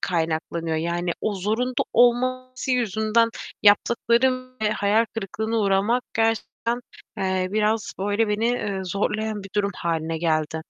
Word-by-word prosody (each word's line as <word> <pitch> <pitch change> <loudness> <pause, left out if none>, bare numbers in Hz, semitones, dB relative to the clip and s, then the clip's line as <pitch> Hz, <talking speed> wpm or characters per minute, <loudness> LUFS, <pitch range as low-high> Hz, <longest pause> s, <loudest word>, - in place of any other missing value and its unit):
kaynaklanıyor. 165 -1 -1
Yani, 170 +2 -1
o 210 - -1
zorunda 225 +6 0
olması 255 +2 +2
yüzünden 230 -1 +2 0.3
yaptıklarım 240 +4 +3
ve 210 - +2
hayal 210 +2 +2
kırıklığına 220 +2 -2
uğramak 205 +5 +2
gerçekten, 225 +1 0 0.4
eee, 185 -1 0
biraz, 215 +1 0
böyle, 205 +3 +1
beni, 210 +2 +1
eee, 205 -5 -1
zorlayan 210 +3 -2
bir 195 - -10
durum 200 -1 +1
hâline 165 -1 -2
geldi. 160 -1 0
210 Hz, 125 wpm, -24 LUFS, 185-235 Hz, 0.4 s, yaptıklarım